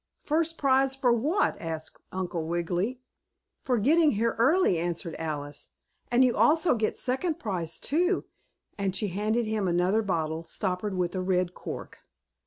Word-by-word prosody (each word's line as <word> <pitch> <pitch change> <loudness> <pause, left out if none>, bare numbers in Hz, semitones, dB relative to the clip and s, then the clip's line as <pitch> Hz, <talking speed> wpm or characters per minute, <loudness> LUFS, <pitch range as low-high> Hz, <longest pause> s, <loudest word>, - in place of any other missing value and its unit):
"First 325 +2 0
prize 270 -1 +3
for 255 -3 +3
what?" 300 - +1
asked 160 -1 -5
Uncle 175 -3 -3
Wiggily. 175 +8 -1 0.6
"For 250 -2 +1
getting 305 +8 +4
here 230 +2 0
early," 270 - +4
answered 170 -1 -3
Alice. 145 -3 -5 0.4
"And 245 +2 +5
you 250 - +2
also 320 +2 +4
get 220 -3 -1
second 280 +6 -1
prize, 175 -6 -3
too," 355 +5 +1 0.5
and 195 -2 -1
she 210 -1 0
handed 215 +5 0
him 215 -3 -1
another 180 +5 +2
bottle, 165 -5 -2
stoppered 190 +2 -2
with 175 -1 0
a 185 - -2
red 180 -1 0
cork. - - -8
210 Hz, 150 wpm, -28 LUFS, 175-260 Hz, 0.6 s, And